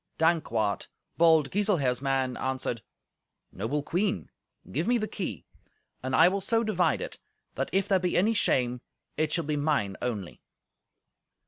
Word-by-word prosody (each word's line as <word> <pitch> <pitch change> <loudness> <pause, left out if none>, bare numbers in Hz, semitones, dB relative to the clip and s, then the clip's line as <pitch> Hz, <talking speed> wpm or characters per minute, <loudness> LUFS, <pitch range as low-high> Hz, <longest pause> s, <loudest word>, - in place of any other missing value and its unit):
Dankwart, 120 -11 +1 0.3
bold 160 -4 +4
Giselher's 175 -12 +1
man, 135 -2 0
answered, 130 -3 -2 0.7
"Noble 125 +10 -2
Queen, 190 +6 -1 0.4
give 160 +6 -1
me 245 0 +4
the 215 -2 -2
key, 170 - -5 0.6
and 130 0 -1
I 165 - +7
will 195 +2 0
so 225 +4 +2
divide 185 - +1
it - - -6 0.3
that, - - -2
if 195 0 +1
there 190 -2 +3
be 180 -1 0
any 215 +5 +3
shame, 125 - +1 0.3
it 155 -1 0
shall 170 -1 0
be 150 0 -1
mine 145 -10 0
only." 110 -7 -4
155 Hz, 145 wpm, -28 LUFS, 125-190 Hz, 0.7 s, I